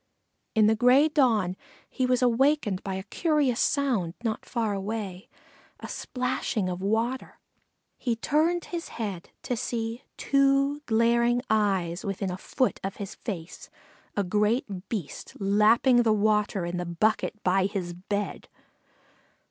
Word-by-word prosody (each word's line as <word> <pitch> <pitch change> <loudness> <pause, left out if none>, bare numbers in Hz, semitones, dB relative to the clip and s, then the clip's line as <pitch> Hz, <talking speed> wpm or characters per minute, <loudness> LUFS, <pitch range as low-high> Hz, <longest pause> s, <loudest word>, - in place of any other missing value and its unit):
In 215 -1 +5
the 220 +1 +4
gray 250 +6 +5
dawn 225 - +2 0.3
he 255 - -1
was 250 0 +2
awakened 245 -5 +2
by 195 -2 -3
a 190 - -4
curious 285 - +1
sound 235 - +1
not 220 -2 -3
far 225 -4 -1
away 195 -2 -5 0.5
a - - -7
splashing 250 -6 -2
of 180 0 -4
water. 225 +6 -1 0.6
He 240 -3 0
turned 315 +8 +1
his 340 -1 -3
head 200 -6 -4
to 250 - -1
see 230 0 -3 0.2
two 275 +1 +2
glaring 235 +2 +3
eyes 195 -5 +1
within 195 -1 -3
a 180 - -4
foot 255 - -1
of 195 +1 -3
his 200 -1 -6
face 180 -7 -7 0.5
a 205 - +2
great 210 0 0
Beast 195 -11 -5
lapping 215 +5 +4
the 225 -2 +3
water 210 -3 +1
in 175 +1 -3
the 175 - -3
bucket 215 +7 0
by 190 +1 +3
his 185 -3 -4
bed. 200 +3 -4
220 Hz, 140 wpm, -27 LUFS, 195-250 Hz, 0.6 s, In